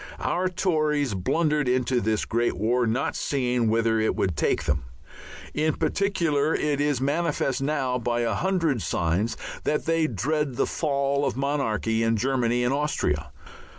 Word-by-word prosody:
Our 185 +1 0
Tories 155 - 0
blundered 150 - +1
into 125 0 +1
this 110 +1 0
great 120 +1 0
war, 120 +3 +1
not 115 +4 -1
seeing 125 -4 0
whither 115 0 +2
it 110 - +1
would 90 -4 0
take 70 - +1
them. 75 -2 -1 0.7
In 155 0 +1
particular 165 -7 +1
it 145 -1 0
is 145 -3 +1
manifest 145 -1 0
now 135 -3 0
by 120 0 -1
a 115 -2 0
hundred 165 - 0
signs 85 +7 0 0.3
that 150 - 0
they 165 -1 +2
dread 140 +4 -1
the - - +1
fall 140 -2 0
of - - -1
monarchy 115 -5 0
in 115 0 +2
Germany 125 0 +1
and 125 +2 +1
Austria. 80 - -1
130 Hz, 150 wpm, -25 LUFS, 115-150 Hz, 0.7 s, whither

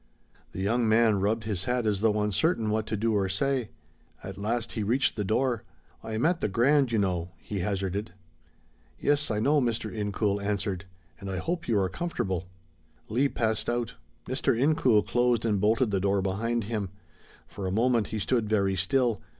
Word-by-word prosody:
The 95 - -5
young 115 +3 +1
man 110 -2 +4
rubbed 105 +3 0
his 105 -4 -2
hat 125 -1 0
as 105 -2 +1
though 105 -1 +2
uncertain 105 - +1
what 110 0 -1
to 110 - -2
do 115 +2 +1
or 100 -2 +1
say. 125 +3 0 0.5
At 95 - -6
last 110 +3 -2
he 110 - -3
reached 120 +6 +1
the 105 - -1
door, 115 +3 +1 0.4
"I 110 - -6
am 110 - 0
at 175 +1 +2
the - - +1
Grand, 130 +6 +3
you 115 - +1
know," 90 -3 -1
he 100 +4 -5
hazarded. 100 +2 -2 0.9
"Yes, 145 +1 +1
I 105 -2 0
know," 145 +6 +3
Mr. 115 -3 -1
Incoul 105 -1 -1
answered, 100 -2 -2 0.3
"and 100 - -7
I 95 - -3
hope 170 - -3
you 115 - +2
are 95 -2 +2
comfortable." 95 - -3 0.6
Leigh 130 +6 +2
passed 110 -4 -1
out. 120 -1 -1 0.3
Mr. - - +1
Incoul 130 -7 +4
closed 120 -2 +1
and 105 -4 +1
bolted 110 +2 +2
the 100 - +1
door 100 0 +1
behind 115 +5 -1
him. 105 -2 -3 0.6
For 95 -1 -6
a - - -1
moment 115 +1 +2
he 110 - -4
stood 110 +1 0
very 100 -3 +2
still. 115 +4 +1
110 Hz, 185 wpm, -28 LUFS, 100-120 Hz, 0.9 s, man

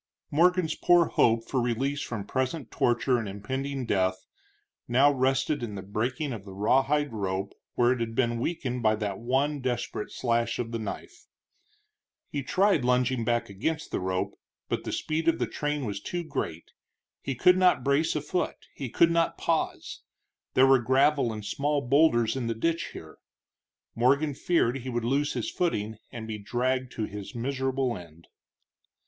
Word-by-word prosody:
Morgan's 175 +1 +3
poor 175 -1 +4
hope 115 0 +2
for 130 - 0
release 135 +4 -1
from 105 -4 -4
present 130 +3 -2
torture 120 +1 +2
and 110 -3 -4
impending 130 +7 -4
death 95 -3 0 0.6
now 135 +4 +5
rested 135 +2 +1
in 110 -4 -4
the 95 - -6
breaking 120 +8 -2
of 105 -4 -7
the 95 -1 -10
rawhide 135 +6 +2
rope 95 -2 -2 0.2
where 120 0 +4
it 130 - 0
had 115 -1 -3
been 120 -2 +1
weakened 125 -4 -2
by 110 -1 +3
that 105 -2 -3
one 135 +5 0
desperate 125 -4 -3
slash 115 -1 0
of 115 -1 -3
the 115 - -2
knife. 110 - -7 1.0
He 145 - -2
tried 190 +1 +2
lunging 125 0 +2
back 120 +1 0
against 125 +12 -3
the - - -1
rope, 95 0 -2 0.3
but - - -2
the - - -3
speed 160 +2 -2
of 165 0 +4
the - - 0
train 150 -2 -2
was 100 -2 -4
too 175 +8 -3
great; 85 - -4 0.5
he 135 - -3
could 180 +9 +5
not 180 -8 +4
brace 140 +4 +2
a 150 - 0
foot, 175 +5 -2 0.2
he 135 -3 -5
could 170 +8 +4
not 170 0 +1
pause. 165 -1 -2 0.5
There 130 - +7
were 135 -1 +6
gravel 135 +1 +3
and 105 -1 -6
small 145 +7 0
boulders 135 -4 +3
in 125 -3 -2
the 115 - -1
ditch 165 +8 0
here. - - -11 0.7
Morgan 140 +5 +2
feared 135 -5 +1
he 130 +1 -6
would 120 -2 -2
lose 140 +4 +1
his 120 -3 -3
footing 110 -11 -1
and 115 -2 -7
be 110 -1 -5
dragged 125 +4 -1
to 110 - -3
his 100 0 -8
miserable 130 0 -1
end. 85 -3 -12
125 Hz, 170 wpm, -28 LUFS, 115-145 Hz, 1.0 s, There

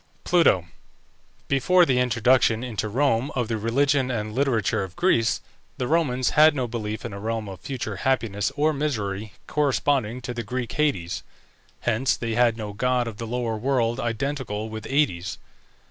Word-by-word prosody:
PLUTO. 165 - +4 0.8
Before 175 +7 +4
the 130 -5 +2
introduction 125 -1 +3
into 110 -3 -3
Rome 130 +1 +1
of 120 -3 -1
the 115 - 0
religion 135 +4 +2
and 110 -3 -3
literature 125 -7 +1
of 95 -2 -8
Greece, 115 -11 +2 0.4
the 125 - -2
Romans 130 -6 +1
had 155 0 +6
no 130 -3 -1
belief 110 -2 -4
in 115 - -5
a 100 - -6
realm 110 0 -3
of 95 -2 -8
future 120 -7 -5
happiness 110 -3 0
or 155 +2 +2
misery, 110 -8 -3
corresponding 135 -5 +1
to 125 0 -5
the 120 - -3
Greek 125 +2 -4
Hades; 90 - 0 0.6
hence 120 +3 +1
they 115 -1 -3
had 120 -1 +3
no 105 -2 -5
god 125 +2 +1
of 110 -2 -6
the 115 - -5
lower 120 -1 -2
world 120 0 0
identical 115 -3 -3
with 110 -1 -7
Aïdes. 130 - 0
120 Hz, 160 wpm, -24 LUFS, 110-135 Hz, 0.8 s, had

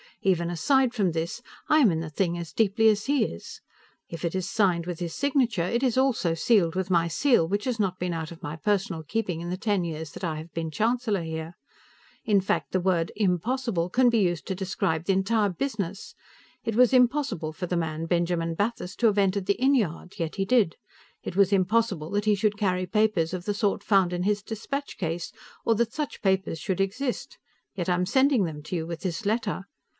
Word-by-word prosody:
Even 175 -3 +2
aside 260 - +2
from 200 -7 +1
this, 165 +7 -3 0.3
I 310 - +5
am 240 -10 +5
in 160 - -1
the 160 -1 -5
thing 170 +2 -1
as 170 -2 -7
deeply 220 +1 +3
as 210 -1 +1
he; 270 - +1 0.7
if 170 +1 -5
it 170 - -2
is 185 0 -2
signed 185 -5 +2
with 175 -2 -5
his 170 -2 -4
signature, 260 -9 +1
it 235 +8 0
is 255 -2 +1
also 240 -11 +2
sealed 175 -2 +2
with 190 0 -2
my 170 -2 +3
seal, 205 - +3
which 205 +3 -1
has 250 -3 -1
not 190 -3 0
been 180 -1 -2
out 160 -1 -4
of 170 +1 -11
my 150 -3 -5
personal 190 -2 -1
keeping 180 -1 -2
in 175 - -5
the 180 - -2
ten 200 -2 0
years 160 -2 -5
that - - -10
I 160 -3 -1
have 160 +2 -9
been 165 -1 -3
Chancellor 220 +1 0
here. 160 +1 -5 0.7
In 205 -2 +3
fact, 190 - -1
the 185 - +1
word 175 -3 +1
"impossible" 205 -1 0
can 250 +5 +4
be 235 -1 +2
used 175 -7 0
to 190 - -2
describe 175 -4 -1
the 195 - +2
entire 205 +2 +2
business. 200 -2 -4 0.5
It 225 -2 -2
was 250 +1 +5
impossible 250 - +2
for 180 - -4
the 180 0 -1
man 160 -1 -2
Benjamin 170 -1 0
Bathurst 205 0 -3
to 235 - +5
have 210 -2 +2
entered 195 -1 +1
the 200 - +4
inn 265 +2 +4
yard 185 - -2
yet 165 -4 -3
he 195 - -1
did. 210 -5 +2 0.5
It - - -5
was 200 0 +4
impossible 195 -4 +1
that 205 +1 0
he 210 -1 +4
should 210 0 0
carry 185 -3 0
papers 200 -4 +1
of 180 -1 -4
the 205 - -1
sort 205 -1 0
found 195 -4 +3
in 175 0 -1
his 205 +1 0
dispatch 275 +7 -5
case, 170 -1 -3 0.3
or 230 - +4
that 230 +1 0
such 300 -2 -4
papers 190 -4 +1
should 190 +1 -1
exist 245 +7 -3 0.4
yet 180 -2 -2
I - - +4
am 180 +1 0
sending 265 0 +3
them 155 -3 -6
to 165 - -5
you 165 -1 -2
with 170 -1 -6
this 185 +3 -3
letter. 205 -3 -1
190 Hz, 215 wpm, -26 LUFS, 170-220 Hz, 0.7 s, I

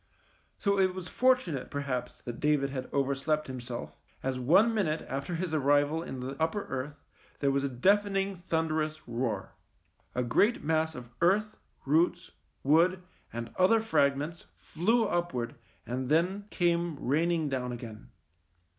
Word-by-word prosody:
So 200 -1 +1
it 185 -1 +3
was 185 -1 -5
fortunate 250 - +1
perhaps 140 -3 -4
that 120 -1 -6
David 145 -2 +2
had 130 -2 -5
overslept 140 +2 0
himself, 125 -2 -6 0.3
as 130 -1 -1
one 185 - +5
minute 165 -8 0
after 140 +6 -3
his 170 -1 -3
arrival 145 +2 +3
in 130 -6 -6
the 130 +2 -4
upper 165 +6 0
earth 135 +2 -4 0.4
there 140 -1 +2
was 140 0 +1
a 140 - 0
deafening 195 +7 +2
thunderous 160 -3 -2
roar. 115 -4 -2 0.6
A 125 - +1
great 205 - +2
mass 160 0 +1
of 120 -1 -9
earth, 210 +5 +2 0.3
roots, 170 +5 +2 0.3
wood, 170 +6 +4 0.3
and 115 0 -6
other 190 +5 +5
fragments 150 -6 0
flew 225 +8 +1
upwards 170 - -1 0.3
and 125 +1 -3
then 180 +6 +2
came 170 -3 +1
rain 155 +6 +1
ing 165 -3 +1
down 130 -3 -2
again. 115 -3 -8
155 Hz, 145 wpm, -30 LUFS, 130-180 Hz, 0.6 s, one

